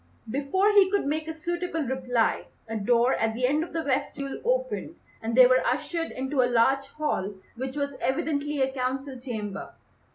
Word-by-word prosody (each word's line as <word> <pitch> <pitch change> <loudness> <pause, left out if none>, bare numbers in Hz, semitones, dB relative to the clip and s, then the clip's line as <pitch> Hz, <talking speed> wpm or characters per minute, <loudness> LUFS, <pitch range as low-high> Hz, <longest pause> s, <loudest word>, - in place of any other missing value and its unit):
Before 290 - +2
he 400 -2 +6
could 400 -4 +1
make 310 +2 -1
a 320 - -3
suitable 345 0 -2
reply, 250 -3 0 0.2
a 225 - -4
door 235 +4 +3
at 225 0 0
the 250 +2 +1
end 295 +5 +2
of 340 - -8
the 330 -1 -2
vestibule 275 0 -2
opened - - -1 0.3
and 225 0 -2
they 255 0 +9
were 255 +1 +5
ushered 330 -1 -1
into 265 +1 -1
a 245 - +2
large 265 +3 +3
hall 275 -10 -2 0.2
which 260 +2 -5
was 280 -1 -1
evidently 285 +1 0
a 265 - 0
council 265 +1 -3
chamber. 215 -6 -5
270 Hz, 175 wpm, -27 LUFS, 250-315 Hz, 0.3 s, they